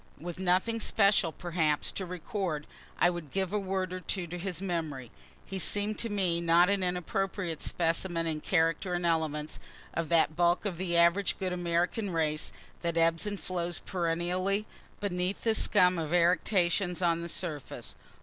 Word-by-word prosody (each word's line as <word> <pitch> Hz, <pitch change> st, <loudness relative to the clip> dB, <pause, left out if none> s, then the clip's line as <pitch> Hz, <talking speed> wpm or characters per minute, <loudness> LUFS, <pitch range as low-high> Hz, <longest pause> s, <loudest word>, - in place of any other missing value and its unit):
With 175 Hz, +3 st, -6 dB
nothing 190 Hz, +5 st, +1 dB
special, 200 Hz, -6 st, +3 dB
perhaps, 160 Hz, -3 st, 0 dB
to 190 Hz, -, -4 dB
record, 180 Hz, -3 st, -3 dB, 0.3 s
I 175 Hz, -, +5 dB
would 170 Hz, -4 st, -6 dB
give 190 Hz, +4 st, -2 dB
a 210 Hz, -, +2 dB
word 190 Hz, -1 st, -2 dB
or 185 Hz, -, -3 dB
two 180 Hz, +1 st, -3 dB
to 175 Hz, +1 st, -6 dB
his 180 Hz, -2 st, -3 dB
memory. 160 Hz, -, -3 dB, 0.3 s
He 195 Hz, -, -5 dB
seem'd 205 Hz, +3 st, +1 dB
to 230 Hz, -, -1 dB
me 185 Hz, -5 st, +1 dB
not 170 Hz, +2 st, +5 dB
an 200 Hz, -1 st, +1 dB
inappropriate 180 Hz, -1 st, -2 dB
specimen 165 Hz, 0 st, +1 dB
in 155 Hz, -2 st, -2 dB
character 165 Hz, +2 st, +1 dB
and 175 Hz, 0 st, -2 dB
elements, 155 Hz, -2 st, 0 dB, 0.3 s
of 165 Hz, -2 st, -2 dB
that 160 Hz, -2 st, +3 dB
bulk 175 Hz, +3 st, +2 dB
of 180 Hz, -4 st, -3 dB
the 175 Hz, -2 st, 0 dB
average 170 Hz, +4 st, +3 dB
good 185 Hz, -2 st, -2 dB
American 175 Hz, +4 st, 0 dB
race 155 Hz, -3 st, 0 dB, 0.3 s
that 170 Hz, -1 st, -2 dB
ebbs 165 Hz, +4 st, +3 dB
and 205 Hz, -1 st, -3 dB
flows 175 Hz, -2 st, -2 dB
perennially 180 Hz, +3 st, -1 dB, 0.3 s
beneath 185 Hz, -1 st, -2 dB
this 225 Hz, -2 st, +2 dB
scum 180 Hz, -1 st, +4 dB
of 160 Hz, +1 st, -1 dB
eructations 180 Hz, +1 st, +2 dB
on 170 Hz, -1 st, +2 dB
the 170 Hz, -, -5 dB
surface. 160 Hz, -6 st, -4 dB
175 Hz, 165 wpm, -30 LUFS, 165-190 Hz, 0.3 s, I